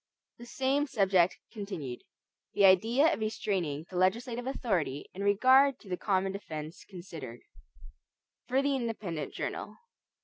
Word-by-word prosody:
28 240 Hz, -, -11 dB
The 240 Hz, -, -12 dB
Same 270 Hz, +4 st, +1 dB
Subject 190 Hz, -7 st, +3 dB, 0.2 s
Continued 185 Hz, -, -6 dB, 0.5 s
(The 200 Hz, -, +5 dB
Idea 225 Hz, -, +5 dB
of -, -, -4 dB
Restraining 185 Hz, -8 st, -2 dB
the 180 Hz, -, -4 dB
Legislative 235 Hz, +7 st, 0 dB
Authority 185 Hz, -, -1 dB
in 195 Hz, -, -7 dB
Regard 260 Hz, +7 st, +5 dB
to 200 Hz, -, -15 dB
the 180 Hz, -, 0 dB
Common 190 Hz, 0 st, 0 dB
Defense 160 Hz, -4 st, -7 dB
Considered) 170 Hz, -, -9 dB, 1.1 s
For 260 Hz, +2 st, +2 dB
the 280 Hz, -1 st, +1 dB
Independent 215 Hz, -, -3 dB
Journal. -, -, -5 dB
200 Hz, 135 wpm, -30 LUFS, 180-245 Hz, 1.1 s, The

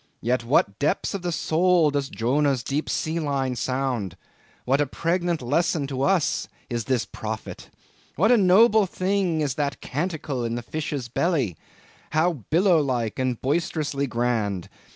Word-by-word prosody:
Yet 125 Hz, +1 st, 0 dB
what 115 Hz, -5 st, +2 dB
depths 150 Hz, -, 0 dB
of 200 Hz, -, -3 dB
the 175 Hz, 0 st, -2 dB
soul 165 Hz, -1 st, +3 dB
does 140 Hz, -1 st, -1 dB
Jonah's 135 Hz, +2 st, +1 dB
deep 145 Hz, +5 st, -2 dB
sealine 140 Hz, -5 st, -1 dB
sound! 125 Hz, -6 st, -2 dB, 0.5 s
what 135 Hz, +3 st, +2 dB
a 145 Hz, -, +1 dB
pregnant 170 Hz, 0 st, -1 dB
lesson 150 Hz, +3 st, +1 dB
to 135 Hz, -1 st, -4 dB
us 180 Hz, +1 st, +1 dB, 0.2 s
is 120 Hz, -2 st, -2 dB
this 130 Hz, -2 st, 0 dB
prophet! 110 Hz, 0 st, -7 dB, 0.5 s
What 210 Hz, -, +3 dB
a -, -, +7 dB
noble 210 Hz, +2 st, +5 dB
thing 185 Hz, -3 st, 0 dB
is 145 Hz, -4 st, 0 dB
that 140 Hz, -1 st, -2 dB
canticle 150 Hz, -4 st, -3 dB
in 115 Hz, 0 st, -2 dB
the 120 Hz, -, -4 dB
fish's 145 Hz, -1 st, -4 dB
belly! 130 Hz, -, 0 dB, 0.6 s
How 170 Hz, +3 st, +3 dB, 0.2 s
billow 175 Hz, 0 st, +4 dB
like 125 Hz, -6 st, -2 dB
and 130 Hz, -2 st, -1 dB
boisterously 145 Hz, -1 st, -1 dB
grand! 115 Hz, -6 st, -1 dB
140 Hz, 150 wpm, -24 LUFS, 125-170 Hz, 0.6 s, a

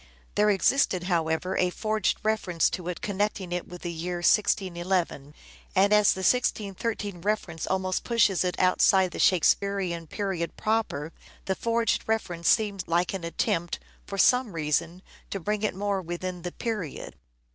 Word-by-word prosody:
There 210 Hz, 0 st, +3 dB
existed, 195 Hz, -2 st, +2 dB
however, 170 Hz, 0 st, 0 dB
a 180 Hz, -, +2 dB
forged 215 Hz, +2 st, 0 dB
reference 195 Hz, -6 st, +1 dB
to 180 Hz, -2 st, -5 dB
it 180 Hz, -, -4 dB
connecting 200 Hz, -2 st, -2 dB
it 180 Hz, 0 st, -3 dB
with 180 Hz, 0 st, -10 dB
the 175 Hz, -, -3 dB
year 170 Hz, +2 st, -4 dB
1611; 175 Hz, -5 st, +1 dB, 0.4 s
and 200 Hz, +2 st, +4 dB
as 210 Hz, -1 st, +5 dB
the 190 Hz, -, -6 dB
1613 205 Hz, -3 st, 0 dB
reference 185 Hz, -5 st, -2 dB
almost 185 Hz, -1 st, -1 dB
pushes 210 Hz, -6 st, +2 dB
it 180 Hz, -1 st, -2 dB
outside 185 Hz, 0 st, +4 dB
the -, -, -7 dB
Shakespearean 185 Hz, -2 st, +2 dB
period 190 Hz, -3 st, -3 dB
proper, 215 Hz, -9 st, -1 dB, 0.3 s
the 190 Hz, -, 0 dB
forged 230 Hz, +2 st, 0 dB
reference 180 Hz, -6 st, -1 dB
seems 205 Hz, -4 st, +1 dB
like 175 Hz, +2 st, +1 dB
an 190 Hz, -3 st, -4 dB
attempt, 170 Hz, 0 st, -1 dB, 0.3 s
for 195 Hz, -, -5 dB
some 250 Hz, 0 st, +4 dB
reason, 165 Hz, +3 st, -1 dB, 0.3 s
to 195 Hz, -, -3 dB
bring 210 Hz, +3 st, -2 dB
it 215 Hz, -, -1 dB
more 200 Hz, 0 st, -1 dB
within 175 Hz, +1 st, -5 dB
the 175 Hz, +1 st, -5 dB
period. 210 Hz, -, -5 dB
185 Hz, 150 wpm, -27 LUFS, 175-210 Hz, 0.4 s, as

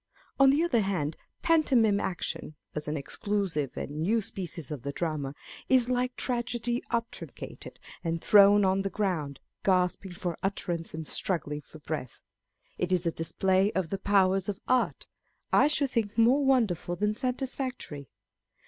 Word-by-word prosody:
On 270 Hz, 0 st, +7 dB
the 290 Hz, +4 st, +3 dB
other 295 Hz, -9 st, +2 dB
hand, 180 Hz, -7 st, -1 dB, 0.3 s
pantomime 255 Hz, -11 st, +4 dB
action 175 Hz, -4 st, -3 dB, 0.2 s
(as 150 Hz, 0 st, -4 dB
an 150 Hz, +1 st, -1 dB
exclusive 165 Hz, -1 st, -2 dB
and 150 Hz, +2 st, -4 dB
new 215 Hz, +8 st, +2 dB
species 175 Hz, -7 st, -5 dB
of 145 Hz, -5 st, -4 dB
the 140 Hz, +3 st, -3 dB
drama) 145 Hz, -3 st, -3 dB, 0.3 s
is 255 Hz, -2 st, +4 dB
like 250 Hz, 0 st, 0 dB
tragedy 240 Hz, -1 st, -1 dB
obtruncated 230 Hz, 0 st, -5 dB, 0.3 s
and 165 Hz, -1 st, -1 dB
thrown 205 Hz, +2 st, +6 dB
on 190 Hz, +1 st, +2 dB
the 195 Hz, -, -2 dB
ground, 175 Hz, -10 st, -2 dB, 0.2 s
gasping 185 Hz, 0 st, +1 dB
for 175 Hz, -2 st, -4 dB
utterance 175 Hz, -4 st, -3 dB
and 160 Hz, -1 st, -6 dB
struggling 150 Hz, -5 st, -1 dB
for 155 Hz, -, -14 dB
breath. 150 Hz, -5 st, -5 dB, 0.6 s
It 180 Hz, 0 st, -1 dB
is 180 Hz, -1 st, +2 dB
a 170 Hz, -, +2 dB
display 190 Hz, +5 st, +1 dB
of 185 Hz, -3 st, -1 dB
the 195 Hz, -, -3 dB
powers 195 Hz, -1 st, +3 dB
of 200 Hz, -1 st, -3 dB
art, 255 Hz, -1 st, +1 dB, 0.5 s
I -, -, +6 dB
should 290 Hz, -3 st, +1 dB
think 220 Hz, -3 st, -1 dB
more 245 Hz, +5 st, +5 dB
wonderful 225 Hz, -10 st, +2 dB
than 210 Hz, +3 st, 0 dB
satisfactory. 255 Hz, -, -3 dB
195 Hz, 150 wpm, -29 LUFS, 165-235 Hz, 0.6 s, On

